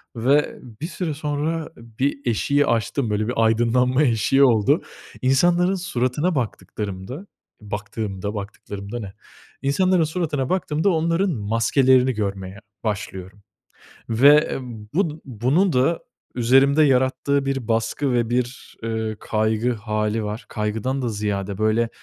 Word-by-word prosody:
ve 135 +6 +2 0.2
bir 160 - -2
süre 175 -4 -3
sonra 150 +2 -2
bir 115 +5 -2
eşiği 140 +5 +2
aştım. 115 +2 0
Böyle 105 +1 0
bir 125 - -1
aydınlanma 125 +5 +3
eşiği 130 +3 +3
oldu. 110 -6 +4 0.4
İnsanların 175 +8 +3
suratına 155 -1 -1
baktıklarımda 110 - -4 0.4
baktığımda, 105 -1 -4
"baktıklarımda" 100 +2 -6
ne? 100 -3 -7 0.5
İnsanların 180 +5 +2
suratına 155 -5 -2
baktığımda 160 -1 +1
onların 170 +2 +1
maskelerini 125 +3 +3
görmeye 100 -2 -4 0.2
başlıyorum 100 -2 -5 0.7
ve 140 +7 +5 0.4
bu 160 -4 0
bunun 135 - +1
da 135 +6 +2 0.3
üzerimde 135 +5 +4
yarattığı 135 +1 +2
bir 135 -4 -2
baskı 115 +4 0
ve 120 -1 +1
bir, 125 +1 -3
eee, 110 -1 -2
kaygı 110 +2 0
hâli 105 0 -2
var. 105 +2 -5
Kaygıdan 110 +5 -2
da 120 - 0
ziyade, 100 -2 -3
böyle, 110 +2 +2
125 Hz, 115 wpm, -22 LUFS, 110-145 Hz, 0.7 s, ve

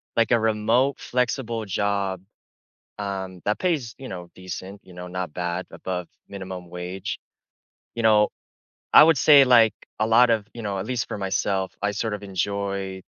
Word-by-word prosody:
like, 115 +1 +2
a 120 - +5
remote 110 +5 +1
flexible 120 -2 -1
job, 100 -1 -1 0.8
um, 95 -2 -5
that 105 - +1
pays, 150 -11 -1
you 130 - -9
know, 90 -2 -7
decent, 95 +2 -8
you - - -16
know, 90 0 -8
not 90 -3 -5
bad, 90 0 -3
above 90 -2 -5 0.2
minimum 95 -3 -8
wage, 90 +2 -5 0.8
you 115 - -3
know 105 -1 +5 0.6
I - - +10
would 160 -2 +5
say, 145 +1 +7
like, 115 -3 +6 0.3
a 110 - +2
lot 120 +2 +5
of 110 -3 +1
you 120 - -7
know, 100 -3 -3
at 95 - -4
least 125 -1 -2
for - - -5
myself, 95 -1 -1
I 105 - +1
sort 105 +2 -2
of 105 - -5
enjoy 100 0 -3
100 Hz, 170 wpm, -24 LUFS, 95-115 Hz, 0.8 s, I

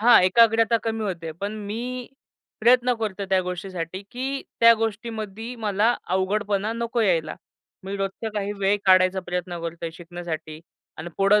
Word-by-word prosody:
हां, 235 -1 +7
एकाग्रता 225 +4 +5
कमी 225 -1 -2
होते. 165 -5 -4
पण 200 +1 -2
मी 245 +4 -4 0.5
प्रयत्न 250 0 +5
करतोय 200 -3 -3
त्या 190 -1 +4
गोष्टीसाठी, 180 0 -5
की 270 +2 -3 0.2
त्या 230 0 +9
गोष्टीमध्ये 225 +1 -4
मला 215 +1 +2
अवघडपणा 200 +3 0
नको 235 +1 -2
यायला. 170 -7 +1 0.5
मी 195 +1 -4
रोजचा 195 +3 -3
काही 205 0 -1
वेळ 200 +1 +3
काढायचा 185 0 +5
प्रयत्न 175 -1 -3
करतोय 165 0 -4
शिकण्यासाठी. 165 -2 -7 0.4
आणि 160 - -5
पुढे 200 +2 +5
200 Hz, 140 wpm, -24 LUFS, 180-225 Hz, 0.5 s, त्या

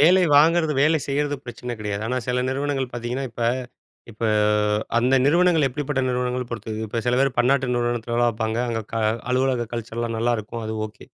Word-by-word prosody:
வேலை 180 +5 +6 0.2
வாங்குறது, 160 +1 +4
வேலை 155 +1 +4
செய்யறது 145 +1 -1
பிரச்சன 120 0 -6
கிடையாது. 105 -1 -3
ஆனா, 125 +2 -1
சில 125 0 +1
நிறுவனங்கள் 135 -2 -2
பாத்தீங்கன்னா, 120 +3 -3
இப்ப 120 - -5 0.7
இப்ப 115 +2 -4 0.7
அந்த 125 +3 +3
நிறுவனங்கள் 165 -1 +4
எப்படிப்பட்ட, 145 +1 -2
நிறுவனங்கள 125 0 -1
பொறுத்தது. 110 -2 -5
இப்ப 115 +2 -3
சில 125 +1 +2
பேர் 135 0 +3
பன்னாட்டு 130 +2 +3
நிறுவனத்தில 120 -1 -1
வேலை 120 0 +3
பாப்பாங்க. 110 0 -2
அங்க 115 -1 -1
க 115 - -1 0.3
அலுவலக 130 -2 +1
கல்ச்சர்லாம் 115 0 -3
நல்லாருக்கும். 115 -1 -1
அது 110 - -3
ஓகே. 105 0 -15
125 Hz, 165 wpm, -23 LUFS, 115-140 Hz, 0.7 s, வேலை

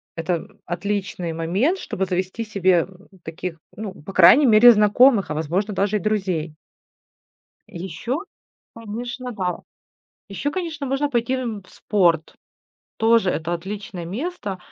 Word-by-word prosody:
это 165 0 -2 0.2
отличный 185 -1 -3
момент, 190 - 0
чтобы 190 - -3
завести 185 +4 -2
себе 190 -5 +2 0.4
таких, 165 +1 -6 0.2
ну, 210 -2 -6
по 190 +2 -11
крайней 210 - +7
мере, 235 0 +8
знакомых, 210 - +4
а, - - 0
возможно, 175 +7 -1
даже 200 +2 +1
и - - -3
друзей. 185 -6 -1 1.1
Еще, 190 - -4 0.6
конечно, 240 +3 -6
да. 185 -5 -3 0.7
Еще, 240 +9 -3
конечно, 320 -4 -4
можно 275 +2 0
пойти, 240 -1 0
эм, 235 -6 -3
в - - -21
спорт. 170 -6 +1 0.6
Тоже 225 -3 +3
это 170 +1 -2
отличное 190 0 -6
место, 205 - -4
200 Hz, 125 wpm, -22 LUFS, 175-230 Hz, 1.1 s, мере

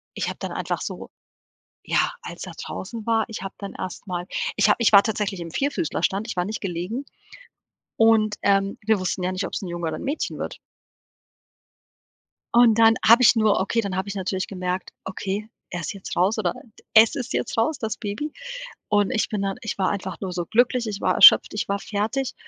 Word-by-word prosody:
ich - - -2
habe - - -6
dann - - -5
einfach - - -3
so - - -6 0.7
ja, - - +1
als - - -8
er - - -8
draußen 230 -2 -7
war, 225 -1 +2
ich 220 - -6
habe 195 - -6
dann 200 -1 -7
erst 185 +2 -7
mal 180 -1 -4 0.3
ich 210 0 +4
habe - - +5
ich 230 - +4
war 200 - +9
tatsächlich 205 -4 -2
im 170 - -6
Vierfüßlerstand, 270 - -1
ich - - -5
war 180 - +1
nicht 215 +4 -4
gelegen 195 +8 -4 0.9
und, 220 -2 +4
ähm, 195 0 +1
wir 220 -2 +3
wussten 185 0 -2
ja 180 - 0
nicht, 185 +1 -3
ob's - - -4
'n 185 - -5
Junge 175 -1 -3
oder 155 - -3
'n - - -8
Mädchen 285 +4 -3
wird. - - -5 2.0
Und 235 -2 +6
dann 225 0 +6
habe 230 +3 +8
ich 245 - +7
nur 215 -2 +3
okay, 200 +4 0
dann 195 -3 -4
habe 190 +2 -2
ich 200 - -5
natürlich 190 -1 -2
gemerkt: 180 -1 -4
„Okay, 195 +2 -4 0.2
er 175 - -4
ist 215 - -4
jetzt 195 - -7
raus 195 +5 +2
oder 180 -5 0 0.4
es 220 0 +7
ist 255 - -4
jetzt - - -2
raus, 250 +7 +1
das 220 -1 -3
Baby.“ 225 +9 -4 0.5
Und 205 0 +2
ich 230 -4 0
bin 210 -2 -2
dann 195 -1 -2
ich 220 -3 -4
war 190 -1 +1
einfach 190 -2 -4
nur 190 -2 -4
so 175 -1 -3
glücklich, 240 +3 +2
ich 205 -1 -4
war - - +1
erschöpft, - - +8
ich - - -2
war 200 0 0
fertig 220 +7 -2
205 Hz, 210 wpm, -24 LUFS, 190-225 Hz, 2.0 s, war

